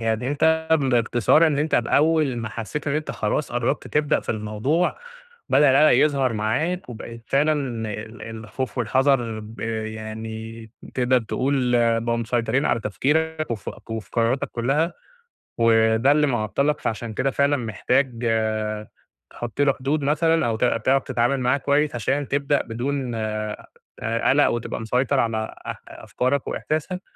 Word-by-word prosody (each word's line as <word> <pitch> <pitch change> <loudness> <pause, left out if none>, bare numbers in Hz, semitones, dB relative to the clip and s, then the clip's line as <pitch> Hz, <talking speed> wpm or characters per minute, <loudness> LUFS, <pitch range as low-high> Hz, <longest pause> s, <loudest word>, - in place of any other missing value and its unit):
يعني 115 +2 -1
أنت 160 +2 +2
بإختصار 125 +4 +3
إن 145 -2 +1
أنت 155 +1 0
بأول 145 +2 +2
ما 115 -2 -3
حَسّيت 115 +8 -5
إن 145 - 0
أنت 155 0 -2
خلاص 150 - -2
قربت 120 0 -1
تبدأ 150 -1 +1
في - - -18
الموضوع، 110 +11 -1 0.5
بدأ 145 -2 +5
القلق 150 +3 +5
يظهر 135 -5 +1
معاك، 130 - -1
وبقيت 115 0 -9
فعلًا 150 +3 +2 0.4
ال 110 +3 -7
الخوف 115 +3 -6
والحذر 120 -2 +1
ب 110 +2 -11 0.3
يعني 110 +1 -7 0.2
تقدر 125 0 +3
تقول 125 +1 0 0.2
بقوا 115 0 -1
مسيطرين 115 +3 0
على 115 - +1
تفكيرك، 155 +8 -1
وف 105 -6 -4 0.2
وفي 110 -1 -5
قرارتك 115 +3 +1
كُلّها، 140 +8 0 0.7
وده 115 +2 +4
اللي 150 0 +3
معطلك 135 +5 0
فعشان 110 0 -3
كده 135 +5 0
فعلًا 140 0 +2
محتاج 125 +1 -1 1.1
تحُطّ 120 +3 -5
له 140 -1 +4
حدود 140 +3 -1
مثلًا، 160 +1 +2
أو 115 - 0
تع 120 0 +1
تعرف 130 +4 +2
تتعامل 130 +1 0
معاه 125 +2 +2
كويس، 145 0 +1
عشان 135 +5 -1
تبدأ 140 +1 +1
بدون 125 +1 -3
آآ 110 -1 -4 0.3
قلق 115 +6 +2
وتبقى 120 -1 -3
مسيطر 125 +4 +1
على 110 -2 -1
أ - - -3
أفكارك 130 +2 -2
وإحساسك، 170 +4 -3
125 Hz, 140 wpm, -23 LUFS, 115-145 Hz, 1.1 s, بدأ